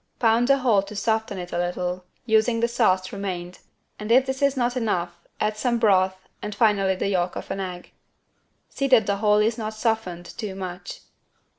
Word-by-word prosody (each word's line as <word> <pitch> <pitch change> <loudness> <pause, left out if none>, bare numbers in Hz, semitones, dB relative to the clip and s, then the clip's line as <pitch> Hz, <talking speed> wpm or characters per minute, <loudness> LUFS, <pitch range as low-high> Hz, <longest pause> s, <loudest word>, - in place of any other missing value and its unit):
Pound 230 +1 +3
the 275 0 +5
whole 235 -7 +3
to 200 +2 -10
soften 220 -1 -1
it 180 -1 -6
a 175 - -1
little 180 +1 -2 0.2
using 225 +1 +3
the 235 - +2
sauce 185 -6 +1
remained 185 -3 -5 0.4
and 210 +1 -4
if 255 +2 +6
this 265 0 -4
is 280 -1 +2
not 245 0 0
enough 180 -8 -1 0.2
add 215 0 0
some 235 +1 +1
broth 190 -4 +2
and 210 -1 -5
finally 200 -4 +3
the 185 - -2
yolk 180 -2 0
of - - -6
an 195 - -3
egg. 180 -2 -6 0.8
See 275 - -2
that 250 -5 +5
the 200 0 0
whole 210 0 +3
is 220 +2 +1
not 215 0 -4
softened 215 -6 -2
too 200 +1 -6
much. 185 - -7
210 Hz, 190 wpm, -24 LUFS, 185-230 Hz, 0.8 s, if